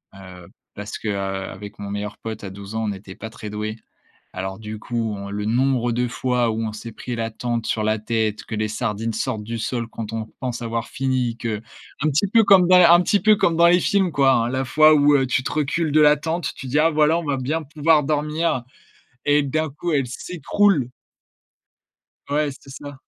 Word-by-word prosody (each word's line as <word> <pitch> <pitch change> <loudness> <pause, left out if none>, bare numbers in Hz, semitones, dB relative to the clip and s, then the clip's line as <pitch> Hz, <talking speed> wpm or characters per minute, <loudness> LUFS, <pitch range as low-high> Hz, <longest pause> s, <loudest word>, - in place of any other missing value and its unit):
Heu, 90 -2 -12 0.3
parce 105 +1 -6
que, 110 - -4
heu, - - 0
avec 95 +1 -5
mon 100 -1 -6
meilleur 105 +1 -4
pote 110 -1 -7
à 100 - -5
12 100 +2 -9
ans, 110 0 -1
on - - -2
n'était 95 -1 -8
pas 110 - -8
très 105 -1 -9
doués. 105 +1 -4 0.6
Alors 95 +1 -5
du 110 0 -7
coup, 115 -1 -3
on 100 0 -7
le 105 +1 -3
nombre 120 +1 +1
de 125 +1 0
fois 125 -1 0
où 110 +1 -2
on 110 - -4
s'est 115 +2 -8
pris 120 +2 -6
la 115 0 -2
tente 120 0 -3
sur 110 - -1
la 110 +1 +1
tête, 110 -1 -1
que 110 - -6
les 110 0 -1
sardines 110 0 -2
sortent 110 -1 -2
du 115 +2 -4
sol 115 +1 -3
quand 115 -1 -7
on 110 -1 -3
pense 125 -2 -3
avoir 115 0 -3
fini, 130 -3 -1
que 110 -2 -3 0.4
un 155 - +2
petit 150 +8 +2
peu 225 +2 +4
comme 190 -3 +6
dans 185 - +7
un 175 -1 +7
petit 200 +3 +2
peu 215 +2 +5
comme 170 -4 +2
dans 170 +1 +6
les 175 +1 +5
films 195 -4 +1
quoi 135 -2 +4
hein, 120 -2 +2
la 130 +1 -1
fois 155 +3 +6
où, 145 0 +5
heu, 135 -1 +1
tu 130 +1 0
te - - -4
recules 150 +2 0
de 155 +1 +4
la 150 0 +6
tente, 165 +3 -2
tu 135 - -8
dis: 135 +4 0
«Ah 160 +2 +4
voilà, 155 +1 +3
on 170 - -4
va 145 -3 -1
bien 150 +6 -2
pouvoir 150 +1 +2
dormir» 150 -2 0 0.6
et 145 0 +4
d'un 155 +3 -1
coup, 155 +4 -4
elle 140 -3 +1
s'écroule. 165 +2 0 1.4
Ouais, 150 +1 +1
c'est 135 - -15
ça. 145 0 -9
125 Hz, 225 wpm, -22 LUFS, 110-150 Hz, 1.4 s, dans